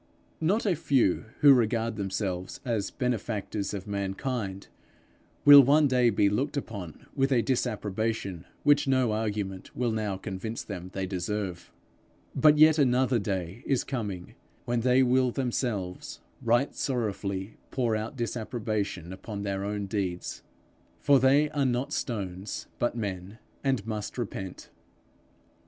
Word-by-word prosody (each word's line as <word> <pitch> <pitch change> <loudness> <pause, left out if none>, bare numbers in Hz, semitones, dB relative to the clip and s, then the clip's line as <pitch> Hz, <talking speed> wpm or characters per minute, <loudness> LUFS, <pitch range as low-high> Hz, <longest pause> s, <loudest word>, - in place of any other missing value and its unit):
Not 195 +9 +1
a 190 -4 +2
few 130 - +2 0.2
who 145 -2 +9
now 135 - +7
regard 115 -1 0
themselves 95 -2 -3
as 110 -5 -1
benefactors 110 -5 -2
of 100 -2 -5
mankind, 100 0 -3 0.8
will 145 -1 +11
one 145 +3 +5
day 125 -2 +4
be 100 -2 +3
looked 130 +9 0
upon 100 - -6
with 135 -1 +1
a 120 -3 +3
disapprobation 110 -6 -2 0.2
which 145 0 +4
no 130 -4 +3
argument 105 -3 -3
will 120 -2 0
now 105 -3 -2
convince 100 +4 -5
them 90 -3 -7
they 95 -1 -2
deserve. 95 -1 -4 0.6
But 150 -1 +5
yet 155 +1 +6
another 130 -2 +3
day 95 0 -3
is 135 -3 +2
coming, 105 -9 -5 0.3
when 120 0 0
they 130 +2 +4
will 130 0 +3
themselves 120 -7 -3 0.2
right 120 +4 +2
sorrowfully 105 -6 -3
pour 120 -4 0
out 110 +6 -4
disapprobation 110 -6 -3
upon 100 +1 -6
their 100 -1 -2
own 100 0 -2
deeds; 95 -3 -3 0.6
for 140 -1 +5
they 140 +4 +4
are 145 -2 0
not 130 +2 0
stones 95 -4 -4
but 120 0 0
men, 100 -1 -4 0.3
and 130 -7 0
must 110 0 -4
repent. 95 -6 -6
110 Hz, 135 wpm, -28 LUFS, 100-130 Hz, 0.8 s, will